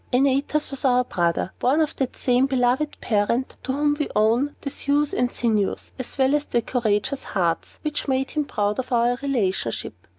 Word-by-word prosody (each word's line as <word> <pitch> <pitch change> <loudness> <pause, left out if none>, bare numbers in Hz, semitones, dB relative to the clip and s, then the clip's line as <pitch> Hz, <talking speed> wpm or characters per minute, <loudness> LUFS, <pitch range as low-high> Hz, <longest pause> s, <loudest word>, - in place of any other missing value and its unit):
"Antaeus 275 +4 +1
was 275 - -4
our 250 -2 +4
brother, 175 -4 -1
born 270 +5 +2
of 310 -2 +1
that 265 -2 -2
same 250 +1 +2
beloved 265 +3 +1
parent 235 +4 0
to - - -3
whom 290 +2 +2
we 295 - -1
owe 230 +6 +3
the 280 - -4
thews 290 +1 0
and 250 0 +1
sinews, 215 -4 -1
as 255 - -6
well 265 +1 +3
as 295 0 +1
the 235 - 0
courageous 240 +3 0
hearts, 170 -4 -1
which 300 -1 -3
made 265 0 0
him 300 - 0
proud 205 -3 -1
of 260 - -4
our 240 0 +3
relationship. 200 - -1
255 Hz, 185 wpm, -23 LUFS, 225-280 Hz, -, our